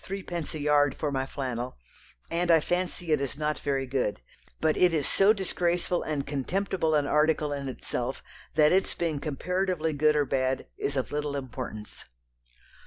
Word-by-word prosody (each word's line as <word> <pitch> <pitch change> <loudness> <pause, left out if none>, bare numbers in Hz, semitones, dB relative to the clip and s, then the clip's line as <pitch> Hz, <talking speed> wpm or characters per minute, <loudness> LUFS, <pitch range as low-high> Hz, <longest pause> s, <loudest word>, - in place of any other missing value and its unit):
_ 195 0 -4
3_d._ 170 -3 -4
a - - -4
yard 145 -2 +3
for 150 - -1
my 135 -1 -1
flannel, 125 - -4 0.5
and 175 +1 0
I 165 -1 +7
fancy 175 0 -2
it 150 -2 +3
is 140 0 -3
not 150 0 -1
very 135 -2 -1
good, 125 -6 -1 0.4
but 155 -1 +2
it 180 -2 +4
is 145 -3 +1
so 195 +2 +5
disgraceful 180 -3 0
and 145 -3 -2
contemptible 160 +3 0
an 145 -1 +2
article 150 0 +2
in 140 -1 -3
itself 125 0 -4 0.3
that 150 -1 +5
its 190 +1 +2
being 160 -4 -1
comparatively 165 +2 -1
good 150 +1 +3
or 145 -1 +3
bad 130 -1 0
is 140 - -2
of 130 - -1
little 145 -1 -2
importance." 125 -5 -6
150 Hz, 175 wpm, -28 LUFS, 135-170 Hz, 0.5 s, I